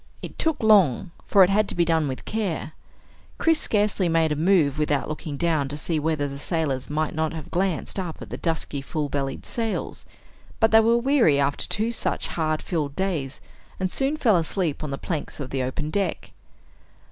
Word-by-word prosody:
It - - -8
took 320 -7 0
long, 190 - +4 0.2
for 195 -2 +6
it 185 - +3
had 210 +1 +3
to - - -1
be 170 - +3
done 160 -2 +2
with 130 -1 -5
care. 200 -8 -2 0.7
Chris 325 -1 +3
scarcely 205 -4 +1
made 165 -1 +2
a - - +1
move 155 -3 +2
without 150 -2 0
looking 150 -1 -5
down 155 -3 +1
to 145 +2 -5
see 160 +1 -1
whether 150 -1 0
the 140 0 -7
sailors 145 -5 -2
might 155 +1 -1
not 160 0 -1
have 160 -3 -8
glanced 185 +1 -1
up 175 -4 -5
at - - -10
the - - -3
dusky 160 -4 -2
full 145 +1 -3
bellied 135 -1 -3
sails, 225 -2 -3 0.5
but 225 -1 +4
they 220 - +8
were 230 +1 +4
weary 235 - +3
after 140 0 0
two 220 +3 0
such 235 - -1
hard 155 -2 -1
filled 150 -5 -2
days 155 -8 -2 0.4
and 185 -1 -1
soon 275 +3 0
fell 225 -10 +4
asleep 165 -2 -1
on 150 - -3
the 135 - -3
planks 155 -1 -4
of 135 -3 -5
the 135 - -1
open 150 +4 -3
deck. 200 +1 -2
160 Hz, 195 wpm, -24 LUFS, 145-195 Hz, 0.7 s, they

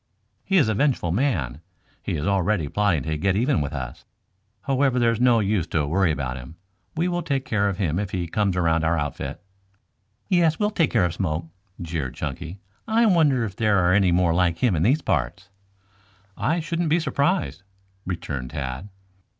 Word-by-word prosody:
"He 195 - +2
is 145 -10 +4
a 110 - +1
vengeful 120 - +1
man. 85 - -1 0.4
He - - -3
is 75 - -2
already 100 -3 +1
plotting 95 -4 +1
to 80 0 -2
get 95 +2 +1
even 125 - +2
with 70 0 -3
us. 65 -5 -6 0.6
However, 135 -1 +1
there's 115 -1 +2
no 125 -2 +5
use 100 -5 0
to 80 -3 0
worry 85 +3 +2
about 65 -4 -3
him. 65 +6 -10 0.4
We 170 +3 +1
will 175 -1 -1
take 140 -5 -2
care 100 -2 +1
of 95 - -4
him 90 -4 0
if 100 -2 -2
he 90 -3 -2
comes 95 +2 0
around 80 -2 +2
our 80 +1 +2
outfit." 75 -2 -4 0.9
"Yes, 170 -5 +3
we'll 210 0 +1
take 170 -7 +2
care 110 -7 +2
of 85 - -2
Smoke," 85 -3 -2 0.3
jeered 80 -7 -4
Chunky. 85 +5 -5 0.3
"I 230 +1 +3
wonder 150 - +3
if 100 -3 -7
there 105 -3 +2
are 90 -1 +3
any 95 -2 +4
more 85 -1 +3
like 85 -1 +2
him 115 -4 +2
in 80 - 0
these 135 - +2
parts?" 85 +8 -2 0.9
"I 165 +3 0
shouldn't 165 +1 -2
be 165 +3 +3
surprised," 165 - 0 0.5
returned 70 -8 -4
Tad. 70 +5 -5
95 Hz, 185 wpm, -24 LUFS, 80-130 Hz, 0.9 s, no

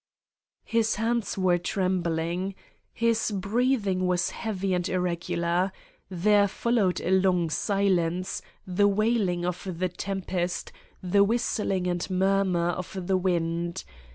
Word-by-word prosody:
His 225 -1 +1
hands 225 0 -1
were 180 -2 +3
trembling. 180 0 -1 0.4
His 230 -1 +1
breath 220 +4 0
ing 185 -1 0
was 180 -1 +1
heavy 195 -4 -2
and 180 -1 0
irregular. 175 0 0 0.4
There 200 +3 +3
followed 210 -3 +1
a 180 - -1
long 185 -3 +3
silence, 185 -2 0 0.2
the 190 +2 +3
wailing 205 -4 +1
of 180 +2 -3
the 185 +1 0
tempest, 180 -1 -3 0.3
the 200 +2 +4
whis 230 +4 0
tling 190 -4 -1
and 175 +1 -1
murmur 190 -2 +2
of 185 +1 -4
the 190 +1 +1
wind. 170 -2 -1
185 Hz, 125 wpm, -27 LUFS, 175-200 Hz, 0.4 s, the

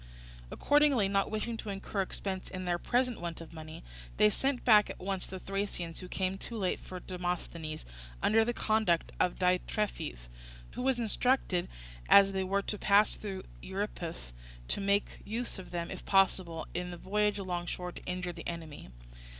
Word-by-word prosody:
Accordingly, 290 - +4
not 195 0 +1
wishing 220 +2 -2
to 220 - -6
incur 195 0 -2
expense 190 0 -3
in 185 -1 -5
their 175 -1 +1
present 250 0 +1
want 170 -2 -4
of 165 0 -10
money, 155 -1 -9 0.3
they 105 +6 +6
sent 270 -1 0
back 210 -4 +7
at - - -6
once 190 0 -2
the 190 - -6
Thracians 190 -3 -3
who 185 - -6
came 190 +1 -1
too 230 - -5
late 190 -4 0
for 185 - -8
Demosthenes, 175 -3 -4 0.3
under 225 +1 +4
the 240 - 0
conduct 215 -7 +1
of 180 - +2
Diitrephes, 180 - 0 0.4
who - - -5
was 260 -1 +2
instructed, 230 -5 +1 0.4
as 195 0 +8
they 190 -1 0
were 195 +2 +1
to 210 - -3
pass 205 +1 +5
through 195 -3 -5
the - - -14
Euripus, 180 - -4 0.4
to - - 0
make 200 +1 +1
use 230 0 -3
of 185 - -9
them 170 -1 -3
if - - -6
possible 185 -4 +2
in 180 0 -2
the 175 - -6
voyage 210 +3 +1
alongshore 180 -1 -3
to - - -10
injure 180 -1 -3
the 165 -1 -7
enemy. 160 - -7
190 Hz, 175 wpm, -32 LUFS, 175-210 Hz, 0.4 s, as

